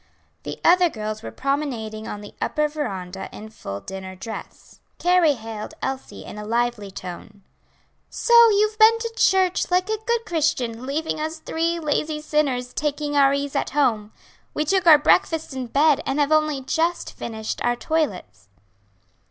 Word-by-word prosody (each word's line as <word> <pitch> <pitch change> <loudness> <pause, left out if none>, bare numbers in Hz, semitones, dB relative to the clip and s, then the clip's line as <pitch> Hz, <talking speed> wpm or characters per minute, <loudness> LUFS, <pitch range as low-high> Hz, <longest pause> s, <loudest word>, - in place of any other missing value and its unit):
The - - -7
other 355 0 +6
girls 215 -4 -5
were - - -6
promenading 245 -6 -3
on 205 - -6
the 205 - -11
upper 300 0 +1
veranda 195 -12 -5
in 215 +1 -10
full 100 - -7
dinner 190 -1 -8
dress. 220 +4 -9 0.2
Carrie 350 -4 +3
hailed 220 -2 -7
Elsie 265 0 -5
in 210 - -8
a - - -6
lively 235 -1 -1
tone. 190 +2 -9 0.7
"So 475 - -1 0.2
you've 425 +1 +2
been 445 +1 +7
to 455 0 -5
church, 375 -4 +2
like 365 +3 +1
a 435 - -1
good 470 -1 +1
Christian, 285 - -1
leaving 310 +3 -2
us 315 +1 -3
three 330 +2 -1
lazy 305 0 -1
sinners 280 -5 -1
taking 295 0 -2
our 275 -1 +5
ease 280 0 -2
at - - 0
home. 220 -7 +1 0.4
We 300 - 0
took 375 +2 +1
our 310 -2 +10
breakfasts 320 0 +2
in 260 -2 -4
bed, 290 +4 +3
and 270 +2 -2
have 290 +1 +2
only 305 -3 +2
just 330 +6 -1
finished 220 -1 -5
our 240 0 +2
toilets." 240 - -3
285 Hz, 160 wpm, -23 LUFS, 220-320 Hz, 0.7 s, our